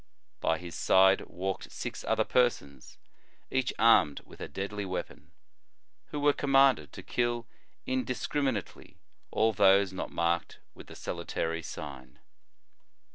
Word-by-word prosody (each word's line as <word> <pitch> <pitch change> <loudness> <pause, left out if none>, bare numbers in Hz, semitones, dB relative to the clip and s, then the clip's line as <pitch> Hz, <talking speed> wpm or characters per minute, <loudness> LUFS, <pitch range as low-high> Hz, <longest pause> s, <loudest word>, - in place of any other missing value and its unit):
By 80 - +1
his 90 -1 -9
side 95 +3 +4
walked 95 +2 -4
six - - -6
other - - +2
persons, 70 - 0 0.5
each 130 -1 +1
armed 110 -10 +4
with - - -16
a - - -4
deadly 100 +1 -4
weapon, 95 -1 -6 0.8
who 150 - -5
were 145 0 +4
commanded 135 - +3
to - - -9
kill 120 -1 -1 0.4
indis 130 -1 -2
criminately 135 -9 -3 0.3
all 110 +1 +2
those 100 -1 +4
not 95 - -4
marked 85 0 -1 0.2
with - - -13
the - - -11
salutary 80 0 -3
sign. 65 -5 -9
100 Hz, 130 wpm, -30 LUFS, 85-125 Hz, 0.8 s, side